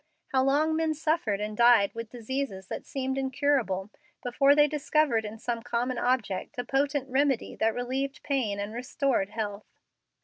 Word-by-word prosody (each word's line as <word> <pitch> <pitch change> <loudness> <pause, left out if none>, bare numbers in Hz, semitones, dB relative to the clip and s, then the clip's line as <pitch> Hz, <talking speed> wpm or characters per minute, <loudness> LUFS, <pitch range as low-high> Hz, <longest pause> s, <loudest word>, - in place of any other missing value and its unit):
How 260 -1 +2
long 300 +4 +2
men 320 -1 0
suffered 305 -10 0
and 210 0 -3
died 235 -3 +5
with 230 -1 -6
diseases 235 -5 -4
that - - -6
seemed 265 0 -2
incurable, 260 -8 0 0.3
before 275 +3 +4
they 295 0 +6
discovered 295 -5 +1
in 210 +1 -6
some 235 +1 -3
common 245 +1 -1
object 245 -1 -1
a 245 - -1
potent 275 +1 0
remedy 270 -1 +1
that 225 0 +1
relieved 265 +3 -3
pain 235 -8 -1
and 205 +2 -4
restored 250 -3 0
health! 210 -1 -4
250 Hz, 160 wpm, -28 LUFS, 220-275 Hz, 0.3 s, they